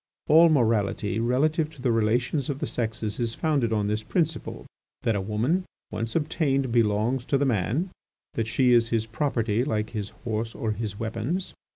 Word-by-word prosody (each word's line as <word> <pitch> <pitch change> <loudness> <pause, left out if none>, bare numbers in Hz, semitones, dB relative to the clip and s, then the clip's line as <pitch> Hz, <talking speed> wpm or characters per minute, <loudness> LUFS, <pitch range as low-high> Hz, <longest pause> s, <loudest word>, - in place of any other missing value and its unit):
All 165 +2 +7
morality 110 -6 +1
relative 150 +7 +1
to - - -17
the 125 - +3
relations 120 +6 +1
of 140 - -1
the - - -2
sexes 110 -2 -3
is 115 -1 -1
founded 140 -8 +1
on 105 -2 +1
this 105 +1 -1
principle: 160 - -2 0.4
that 115 - +2
a 100 - 0
woman 115 - 0 0.3
once 115 0 -4
obtained 140 -4 +1
belongs 115 +2 +2
to 140 - +2
the 140 - +1
man, 130 - 0 0.4
that 115 -1 -1
she 125 +2 +3
is 115 -1 +4
his 115 -2 0
property 115 -2 0
like 110 -5 -1
his 105 -3 -4 0.2
horse 115 0 -2
or 110 - -2
his 105 -1 -4
weapons. 115 +12 -3
115 Hz, 175 wpm, -26 LUFS, 110-140 Hz, 0.4 s, All